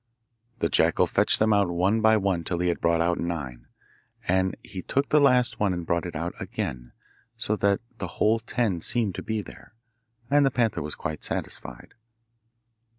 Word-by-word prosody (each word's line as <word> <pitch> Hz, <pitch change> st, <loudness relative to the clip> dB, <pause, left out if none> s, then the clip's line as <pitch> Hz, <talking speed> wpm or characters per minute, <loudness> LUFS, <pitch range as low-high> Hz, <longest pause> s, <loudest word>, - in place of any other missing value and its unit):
The 85 Hz, -, +1 dB
jackal 75 Hz, -, +3 dB
fetched -, -, +2 dB
them 110 Hz, 0 st, +3 dB
out 100 Hz, -3 st, +3 dB
one 95 Hz, +6 st, +1 dB
by 110 Hz, 0 st, +5 dB
one 95 Hz, -4 st, 0 dB
till 85 Hz, +2 st, -2 dB
he 90 Hz, +1 st, +1 dB
had 85 Hz, -, -2 dB
brought 85 Hz, 0 st, +2 dB
out 85 Hz, +1 st, +1 dB
nine, 75 Hz, -8 st, -4 dB, 0.6 s
and 95 Hz, +1 st, +1 dB
he 95 Hz, -, -7 dB
took 140 Hz, +9 st, -1 dB
the 150 Hz, -, +4 dB
last 125 Hz, -3 st, +3 dB
one 100 Hz, -3 st, +2 dB
and 85 Hz, -1 st, -4 dB
brought 85 Hz, 0 st, 0 dB
it -, -, -8 dB
out -, -, -3 dB
again, -, -, -5 dB, 0.5 s
so 110 Hz, -1 st, -1 dB
the 100 Hz, -1 st, +2 dB, 0.2 s
whole 110 Hz, +2 st, +1 dB
ten 110 Hz, -6 st, -1 dB
seemed 110 Hz, -2 st, 0 dB
to -, -, -5 dB
be 110 Hz, -1 st, -3 dB
there, -, -, -14 dB, 0.5 s
and 145 Hz, +2 st, +4 dB
the 135 Hz, -, +4 dB
panther 120 Hz, -4 st, 0 dB
was 75 Hz, 0 st, -4 dB
quite 75 Hz, -1 st, -5 dB
satisfied. 60 Hz, -1 st, -6 dB
95 Hz, 180 wpm, -26 LUFS, 85-110 Hz, 0.6 s, by